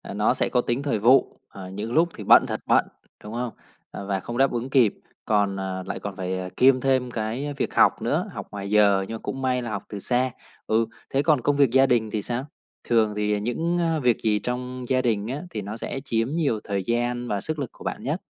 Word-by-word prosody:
nó - - +3
sẽ - - 0
có 125 - +2
tính 120 +4 -2
thời 140 -8 0
vụ, 125 +5 +4
ờ, 95 -2 -9
những 105 +5 -5
lúc 170 +2 +4
thì 105 - -7
bận - - +7
thật - - -3
bận, - - +4 0.4
đúng 105 +2 -8
không? 120 -1 -3 0.6
Và 95 -1 0
không 120 +5 -6
đáp 135 0 +4
ứng 120 +2 -3
kịp, 125 -7 +4 0.3
còn 100 -2 +2 0.3
lại - - -4
còn 100 -2 -6
phải, 95 0 -3
à, 90 0 -5
kiêm 130 -1 +5
thêm 130 -2 +1
cái 120 +7 -3
việc - - -2
học - - +4
nữa, - - 0
học - - -7
ngoài 100 -1 -5
giờ, 100 -2 +4
nhưng 115 - -5
mà - - -7
cũng 135 - -5
may 125 -1 +1
là 120 - -5
học - - -4
từ 105 - -6
xa. 125 +3 +1 0.4
Ừ. 115 +1 +2 0.2
Thế 135 - +1
còn 150 -4 +3
công 145 +4 +1
việc 140 -4 +4
gia 135 +1 +5
đình 115 -4 +1
thì 105 - -1
sao? 120 +5 -1 0.4
Thường 110 -3 +2
thì 105 0 0
những 165 +11 -1 0.2
việc 120 -3 +3
gì 105 -2 +2
trong 125 +1 -4
gia 130 -1 +3
đình 110 -4 0
á, 135 +4 -4
thì 105 - -4
nó 105 +3 -6
sẽ 135 - -4
chiếm 115 0 0
nhiều 145 -9 0
thời 100 -2 -2
gian 120 +2 -1
và 100 -3 -1
sức 155 -1 -3
lực 135 - -3
của - - -14
bạn - - -4
nhất? - - -2
120 Hz, 240 wpm, -24 LUFS, 105-130 Hz, 0.6 s, bận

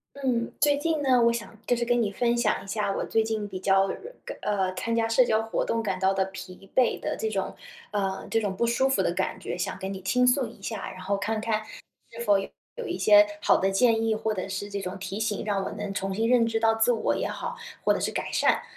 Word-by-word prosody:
嗯， 255 -4 -1
最 290 -1 +4
近 315 +1 0
呢， 255 -3 +4
我 235 0 +5
想 230 -1 -6
就 245 - +3
是 235 - 0
跟 240 0 +2
你 210 - 0
分 235 +3 +1
享 235 -3 +1
一 - - -12
下 205 0 -1
我 - - -2
最 225 - +2
近 220 -1 -2
比 190 -2 -6
较， 195 0 +4
呃， 195 - -1 0.3
个 - - -6
呃， 190 -3 0
参 230 +5 -2
加 230 -1 +2
社 230 +3 +5
交 220 -2 +2
活 225 0 -1
动 230 - 0
感 190 -4 -2
到 190 0 +3
的 195 0 +1
疲 190 0 -10
惫 255 - +3
的 - - -3
这 220 - -2
种 195 -2 -2 0.4
呃， 195 -2 -2
这 225 - +1
种 200 -3 -2
不 235 - +1
舒 240 +3 +2
服 270 - +2
的 - - +1
感 - - -2
觉 - - -5
想 - - -3
跟 190 +1 -4
你 190 - -7
倾 250 +7 +2
诉 250 +1 +3
一 - - -15
下。 195 - -5
然 185 - -10
后 195 +2 -1
看 215 +2 -2
看 220 -1 -1 0.5
是 230 - -9
否 205 -3 +4
有 475 - -9
一 350 - -3
些 210 -1 +7 0.2
好 - - +4
的 195 - +1
建 225 +2 +3
议 225 - +2
或 220 0 -1
者 185 -1 -4
是 195 +1 -4
这 200 0 -4
种 190 0 -5
提 195 +2 -5
醒 215 -2 -1
让 200 -2 0
我 - - -3
能 205 -1 -5
重 195 0 -2
新 225 +4 0
认 245 -2 +4
识 225 -1 0
到 225 0 +3
自 225 +2 +3
我 230 - +1
也 - - -1
好， - - -4 0.3
或 - - +4
者 - - -2
是 - - 0
改 - - -3
善。 - - +3
220 Hz, 285 characters per minute, -27 LUFS, 195-235 Hz, 0.5 s, 些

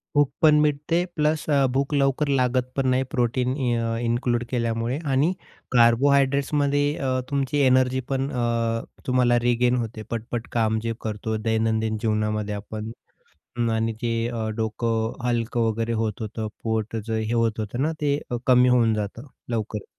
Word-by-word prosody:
भूक 145 -2 +4
पण 155 -2 +6
मिटते, 150 +4 +1
प्लस 155 0 +1
अ, 140 -2 +4
भूक 140 +2 0
लवकर 140 +1 +2
लागत 125 0 0
पण 135 -1 0
नाही, 130 +1 +2
प्रोटीन 125 +1 +1 0.2
अ, 115 0 -1
इन्क्लूड 120 0 0
केल्यामुळे. 115 +1 -1 0.2
आणि 145 +7 +3 0.4
कार्बोहायड्रेट्समध्ये 140 +4 +3
अ, 130 -1 0
तुमची 140 +1 0
एनर्जीपण 130 +1 +1
अ, 125 -2 -1 0.6
तुम्हाला 125 -1 +3
रिगेन 120 +1 +3
होते. 110 0 -9
पट-पट 115 +1 -4
काम 110 -1 +2
जे 115 0 -1
करतो 110 0 -3
दैनंदिन 110 0 +1
जीवनामध्ये 105 -1 -1
आपण. 110 +2 -6 0.8
आणि 110 0 0
जे 115 -1 0
अ, 115 -2 -3
डोकं 115 0 -1
अ, 120 - -3
हलकं 115 -1 0
वगैरे 115 +1 -2
होत 105 -1 -3
होतं, 110 0 -4 0.2
पोटाच 110 0 -2
हे 110 +1 -1
होत 115 -2 +1
होतं 110 +4 -3
ना, 155 +2 +1
ते 145 -1 +2
अ, - - 0
कमी 125 0 +6
होऊन 115 -3 +4
जातं, 105 +5 -4 0.2
लवकर. 110 -3 -3
120 Hz, 150 wpm, -24 LUFS, 110-135 Hz, 0.8 s, पण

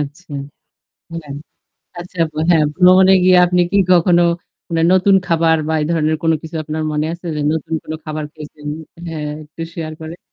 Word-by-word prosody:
আচ্ছা। 150 +3 -7 0.8
হ্যাঁ 155 -4 -7 0.7
আচ্ছা 180 +1 -10 0.3
হ্যাঁ 160 -3 +4
ভ্রমণে 185 +1 +6
গিয়ে 185 0 +6
আপনি 180 0 +1
কি 200 - +3
কখনো 175 0 +4 0.5
মানে 165 -2 0
নতুন 185 +1 +4
খাবার 165 -1 +3
বা 160 - 0
এই 150 - -1
ধরনের 155 -1 +1
কোন 165 - +3
কিছু 160 +1 -7
আপনার 155 +1 -4
মনে 150 +1 -1
আছে 170 +1 -9
যে 150 - -2
নতুন 160 0 -3
কোন 155 - -7
খাবার 155 0 -4
খেয়েছেন? 150 -1 -10 0.4
হ্যাঁ 155 -2 -5 0.2
একটু 155 +2 -9
শেয়ার 155 -2 -5
করেন। 160 +2 -8
160 Hz, 170 wpm, -17 LUFS, 155-175 Hz, 0.8 s, ভ্রমণে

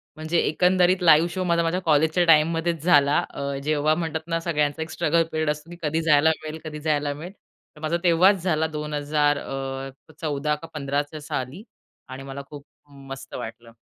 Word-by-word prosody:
म्हणजे 155 +2 -2
एकंदरीत 180 +2 +3
live 165 0 +6
show 185 -1 -2
माझा 170 -1 +1
माझ्या 165 +3 0
कॉलेजच्या 160 +2 +2
टाईममध्येच 165 0 +3
झाला, 145 -4 +4
अ, 140 0 -4
जेव्हा 155 +1 +1
म्हणतात 160 -1 -3
ना 165 0 -1
सगळ्यांचा 150 -2 -1
एक 160 - -4
स्ट्रगल 165 +2 +2
पिरियड 155 -1 -1
असतो, 150 +2 -4
की 175 - -9
कधी 160 +1 0
जायला 160 -1 +4
मिळेल, 155 +1 -6
कधी 150 -1 -7
जायला 150 -2 0
मिळेल. 170 +7 -9 0.4
तर 150 - -15
माझा 160 +2 0
तेव्हाच 180 +2 +4
झाला 160 -3 +1
2000 150 -1 0
अ, 135 +2 -6
14 150 -1 -1
का 165 +2 -11
15 140 -1 -1
च्या 150 +1 -9
साली 140 - -5 0.5
आणि 130 +1 -8
मला 135 +1 -7
खूप 145 -1 -10 0.4
मस्त 135 0 -9
वाटलं. 115 +1 -8
155 Hz, 180 wpm, -24 LUFS, 145-165 Hz, 0.5 s, live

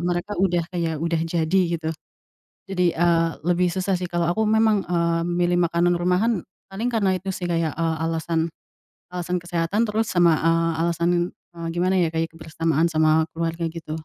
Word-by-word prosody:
mereka 175 +3 -2
udah 175 -3 +2
kayak 165 -3 -1
udah 165 +1 -1
jadi 170 +3 +1 0.2
gitu, 160 0 -3 0.8
jadi, 180 -2 +1
eee, 165 0 +3
lebih 175 +1 +2
susah 190 +1 -1
sih 180 - -3
kalau 175 -1 0
aku 220 +4 0
memang, 220 -2 +3
eee, 170 -1 +1
milih 175 0 +1
makanan 170 +1 +2
rumahan 180 +4 +1 0.3
paling 220 +6 -2
karena 200 -4 +2
itu 190 +2 -6
sih 180 - -4
kayak, 165 -3 0
eee, 165 -1 0
alasan 165 0 -1 0.7
alasan 180 0 -2
kesehatan 175 +4 0
terus 220 +1 0
sama, 170 -3 +4
eee, 165 0 +2
alasan, 170 0 +1 0.3
eee, 170 -1 -10
gimana 185 +2 +1
ya 170 - +2
kayak 165 0 -1
kebersamaan 160 0 0
sama 155 0 +3
keluarga 165 0 -2
gitu. 160 -1 -7
170 Hz, 165 wpm, -23 LUFS, 165-180 Hz, 0.8 s, sama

